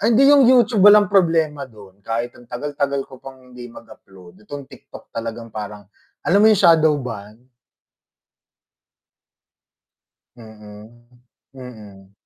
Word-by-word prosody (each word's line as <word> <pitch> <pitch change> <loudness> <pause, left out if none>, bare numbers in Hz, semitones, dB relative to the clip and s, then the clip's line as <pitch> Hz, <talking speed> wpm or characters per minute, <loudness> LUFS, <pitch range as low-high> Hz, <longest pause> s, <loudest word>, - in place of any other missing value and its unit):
Ay, 215 - 0
hindi 275 - +4
yung 275 -4 +5
YouTube 240 -4 +3
walang 205 -1 +6
problema 160 -7 0
dun, 100 -4 -18
kahit 115 +4 -5
ang 120 -1 -19
tagal-tagal 140 +1 -4
ko 130 -2 -16
pang 130 -1 -15
hindi 125 0 -11
mag-upload 95 -6 -17
itong 145 -1 -9
TikTok - - -16
talagang 115 0 -7
parang 105 -1 -8 0.4
alam 195 - +2
mo 215 - +5
yung 215 - +4
shadow 160 -2 +4
banned? 110 -2 -10 2.9
Mm, 110 +1 -16 0.5
mm. 105 -7 -14
125 Hz, 120 wpm, -19 LUFS, 110-155 Hz, 2.9 s, walang